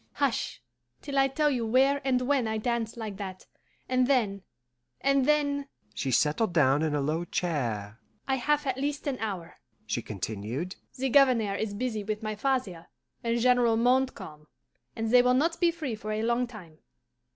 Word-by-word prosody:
"Hush, 270 - -1 0.4
till 280 -1 -5
I 270 - +5
tell 295 +2 +1
you 245 -4 -1
where 265 +5 +3
and 260 -2 +1
when 265 -3 +1
I 220 0 -1
danced 235 0 -2
like 215 -4 -5
that, 190 -2 -7 0.4
and 255 -1 +2
then, 220 -8 +1 0.6
and 275 -1 +2
then 285 -2 +1
" 105 0 -36
She 135 - -3
settled 155 - +2
down 145 -3 +4
in 155 -2 0
a 145 - 0
low 155 +4 -1
chair. 120 - -2 0.3
"I 265 -1 +1
have 295 +3 +1
at 265 -1 -1
least 290 0 -2
an 275 -3 -2
hour," 195 -6 -5 0.3
she - - -2
continued. 110 - -4 0.2
"The 265 +1 0
Governor 250 -6 +4
is 205 0 -3
busy 220 -2 -2
with 215 +1 -4
my 215 0 -2
father 210 -8 -2 0.4
and 230 0 +1
General 245 -2 +4
Montcalm, 245 -11 0 0.5
and 225 0 -2
they 250 0 +8
will 250 0 +3
not 330 +5 +1
be 345 - +4
free 320 -7 -4
for 215 0 -5
a 215 +1 -1
long 235 +2 +1
time. 175 -10 -12
230 Hz, 180 wpm, -28 LUFS, 185-265 Hz, 0.6 s, they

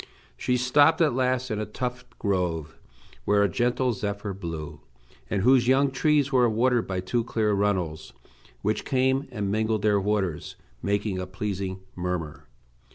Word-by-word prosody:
She 125 - 0
stopped 145 +6 +4
at 155 -6 +3
last 130 0 0
in 105 - -1
a 110 - -2
tufted 125 +3 -5
grove, 85 -6 -1 0.5
where 105 0 +3
a - - +4
gentle 125 +5 +1
zephyr 100 0 -4
blew, 80 -5 -6 0.5
and 100 -2 0
whose 125 0 +5
young 135 +1 +4
trees 145 +1 +2
were 125 -3 +4
watered 120 +2 +2
by 95 -1 -2
two 115 +6 -1
clear 110 -2 0
runnels, 95 -6 -1 0.5
which 105 +1 0
came 130 +1 +1
and 105 -5 -2
mingled 110 0 0
their 105 -1 +3
waters, 95 -6 -1 0.3
making 100 -1 -1
a 90 - -4
pleasing 95 -1 -4
murmur. 90 -4 -4
105 Hz, 155 wpm, -26 LUFS, 95-125 Hz, 0.5 s, whose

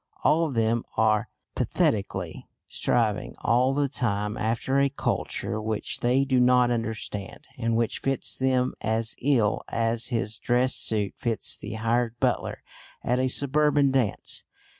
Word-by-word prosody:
All 165 +1 +3
of 140 - -5
them 115 +1 +1
are 110 -1 +2 0.2
pathetically 95 -5 -1 0.2
striving 110 -4 0
all 125 +3 +3
the 145 0 +2
time 105 -6 -1
after 120 +5 0
a 140 0 +3
culture 110 -4 -2
which 110 0 -3
they 130 +3 +2
do 130 -2 +2
not 125 0 +4
understand, 110 -4 -4
and 115 -1 0
which 115 -1 0
fits 135 0 -2
them 130 -1 +1
as 110 0 -1
ill 120 -6 +2
as 115 +1 0
his 110 -3 -1
dress 125 +2 +2
suit 105 -3 +1
fits 115 -2 -1
the 105 - -7
hired 115 +1 0
butler - - -1 0.4
at 125 +1 +1
a 130 - +2
suburban 145 +1 +2
dance. 125 -6 -1
120 Hz, 140 wpm, -26 LUFS, 110-130 Hz, 0.4 s, not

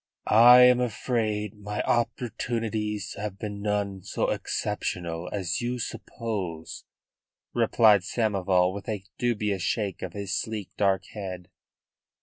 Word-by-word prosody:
"I 120 +3 +8
am 125 0 +7
afraid 110 -4 -1
my 105 +1 -3
opportunities 115 -4 -1
have 105 -2 -4
been 100 0 -5
none 100 -2 -1
so - - -1
exceptional 85 0 -3
as 95 -2 -2
you 120 +1 -2
suppose," 105 -8 -5 0.7
replied 105 -4 +5
Samoval, 95 -4 +1
with 100 +1 -7
a 105 -3 -3 0.2
dubious 105 -5 0
shake 100 +1 -1
of 90 - -5
his 100 -1 -3
sleek, 110 -3 -4
dark 95 -2 +1
head. 95 -3 -6
105 Hz, 120 wpm, -27 LUFS, 95-115 Hz, 0.7 s, I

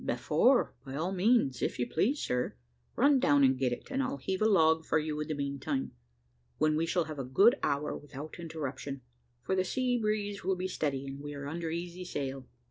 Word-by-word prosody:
"Before, 255 0 +2
by 135 -1 -7
all 165 +6 -1
means, 195 - +2
if - - -1
you 120 - 0
please, 260 - +1
sir. 125 - -1 0.4
Run 280 +1 +5
down 145 - +4
and 130 0 +5
get 130 -1 0
it, 120 - -6
and 270 0 0
I'll 270 +1 -2
heave 190 -7 -2
the 215 - +3
log 160 -4 +4
for - - +1
you 155 -1 -2
in 150 - -3
the 155 - -2
meantime, 140 0 -2 0.7
when 155 0 +2
we 165 +2 0
shall 175 +1 +1
have 155 -2 -7
a - - -1
good 195 - +5
hour 145 +1 0
without 145 +3 -9
interruption, 140 -4 -5 0.4
for - - -1
the 185 - +2
sea 250 +5 0
breeze 210 -2 -1
will 190 +1 +1
be 185 +1 -2
steady, 140 -6 -2
and 135 0 -7
we 145 0 -6
are 140 0 -6
under 165 +2 -3
easy 175 +2 -5
sail." 135 -6 -4
155 Hz, 210 wpm, -31 LUFS, 140-190 Hz, 0.7 s, Run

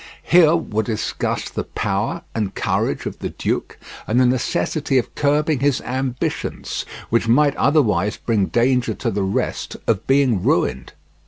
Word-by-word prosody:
Here 170 -2 +5
were 110 -10 -1
discussed 110 0 -3
the - - -2
power - - -2
and 105 -4 -2
courage - - -1
of - - -5
the - - -3
duke - - -3 0.3
and 115 +3 +2
the 130 - +5
necessity 130 +3 0
of 125 - -1
curbing 150 0 +1
his 140 -1 +2
ambitions, 130 0 -3 0.3
which 115 0 +2
might 140 +4 +4
otherwise 105 - +2
bring 105 -5 0
danger 125 +1 +1
to 115 - -2
the 100 0 -1
rest 95 0 -2
of 110 -4 0
being 135 -7 +3
ruined. 65 -6 0
125 Hz, 150 wpm, -21 LUFS, 110-140 Hz, 0.3 s, Here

